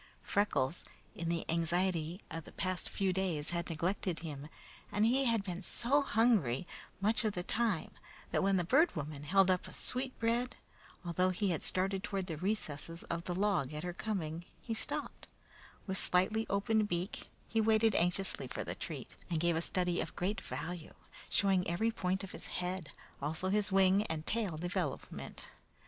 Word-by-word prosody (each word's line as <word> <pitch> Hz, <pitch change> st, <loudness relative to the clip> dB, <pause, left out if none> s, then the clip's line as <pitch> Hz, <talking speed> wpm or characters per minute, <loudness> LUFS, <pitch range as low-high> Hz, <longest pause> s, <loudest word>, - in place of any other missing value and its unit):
Freckles, 180 Hz, -7 st, +1 dB, 0.3 s
in 165 Hz, 0 st, -3 dB
the 170 Hz, -1 st, -1 dB
anxiety 170 Hz, +1 st, +1 dB
of 165 Hz, -1 st, -5 dB
the -, -, -10 dB
past 185 Hz, -1 st, -1 dB
few 190 Hz, -2 st, +1 dB
days, 175 Hz, -5 st, -1 dB
had 170 Hz, 0 st, -2 dB
neglected 170 Hz, +2 st, -1 dB
him, 150 Hz, -3 st, -6 dB, 0.4 s
and 210 Hz, +1 st, +3 dB
he 260 Hz, +4 st, +3 dB
had 230 Hz, -4 st, +2 dB
been 180 Hz, -2 st, -4 dB
so 245 Hz, +9 st, +5 dB
hungry, 215 Hz, -, +3 dB, 0.3 s
much 215 Hz, +4 st, +2 dB
of 215 Hz, -2 st, +1 dB
the 180 Hz, -, -3 dB
time, 220 Hz, -4 st, 0 dB, 0.4 s
that -, -, +2 dB
when 195 Hz, 0 st, +3 dB
the 180 Hz, -, +2 dB
Bird 285 Hz, -, +4 dB
Woman 150 Hz, -1 st, -5 dB
held 190 Hz, +4 st, +5 dB
up 180 Hz, -, 0 dB
a -, -, -11 dB
sweet 255 Hz, +1 st, -1 dB
bread, 235 Hz, +2 st, 0 dB, 0.5 s
although 180 Hz, +2 st, +2 dB
he 185 Hz, +1 st, +1 dB
had 165 Hz, -, -1 dB
started 190 Hz, +1 st, +1 dB
toward 195 Hz, -2 st, -2 dB
the 165 Hz, -3 st, -4 dB
recesses 165 Hz, -4 st, -2 dB
of 170 Hz, 0 st, -2 dB
the 175 Hz, -, -2 dB
log 180 Hz, -8 st, +1 dB
at 150 Hz, -, -4 dB
her 175 Hz, 0 st, -3 dB
coming, 175 Hz, -5 st, -3 dB
he 230 Hz, -, -4 dB
stopped; 220 Hz, -, -4 dB, 0.6 s
with 190 Hz, -1 st, -1 dB
slightly 215 Hz, +5 st, +2 dB
opened 210 Hz, +2 st, +2 dB
beak, 175 Hz, +3 st, -2 dB, 0.2 s
he 225 Hz, -, +2 dB
waited 220 Hz, 0 st, +4 dB
anxiously 180 Hz, +3 st, +1 dB
for -, -, -3 dB
the -, -, -3 dB
treat, -, -, -7 dB
and 165 Hz, -3 st, 0 dB
gave 170 Hz, 0 st, +2 dB
a 160 Hz, -, +1 dB
study 180 Hz, 0 st, +1 dB
of -, -, -5 dB
great 200 Hz, +4 st, -1 dB
value, 175 Hz, -1 st, -5 dB, 0.3 s
showing 190 Hz, -2 st, +3 dB
every 220 Hz, +7 st, +1 dB
point 190 Hz, -3 st, -1 dB
of 190 Hz, -, -6 dB
his -, -, -8 dB
head, 180 Hz, -2 st, -3 dB, 0.3 s
also 160 Hz, +6 st, -1 dB
his 205 Hz, 0 st, +1 dB
wing 190 Hz, +1 st, +5 dB
and 160 Hz, -1 st, -3 dB
tail 205 Hz, -8 st, -1 dB
development. 175 Hz, -1 st, -4 dB
185 Hz, 175 wpm, -34 LUFS, 170-210 Hz, 0.6 s, so